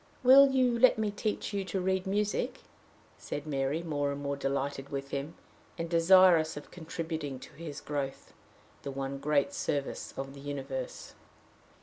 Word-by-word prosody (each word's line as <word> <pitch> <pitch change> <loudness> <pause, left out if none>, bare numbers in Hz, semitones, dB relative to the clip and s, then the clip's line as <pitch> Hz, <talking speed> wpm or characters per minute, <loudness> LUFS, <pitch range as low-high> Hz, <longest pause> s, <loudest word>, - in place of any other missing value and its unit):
"Will 270 +2 +9
you 255 -3 +2
let 255 -1 +6
me 215 -1 0
teach 210 +1 -3
you 200 -1 -1
to 190 +1 -2
read 190 +1 0
music?" 205 +2 -1 0.6
said 145 - -5
Mary, 140 +2 -1
more 145 -3 -1
and 140 - -4
more 140 0 -2
delighted 140 0 -2
with 140 0 -5
him, 140 +4 -4 0.4
and 165 0 -3
desirous 170 -2 +6
of 145 - -9
contributing 160 -4 -5
to - - -12
his 150 -2 -7
growth 140 -2 -4 0.5
the - - -5
one 135 0 -4
great 145 0 +1
service 140 -1 -3
of 135 0 -5
the 140 - -11
universe. 135 -2 -5
150 Hz, 155 wpm, -30 LUFS, 140-185 Hz, 0.6 s, Will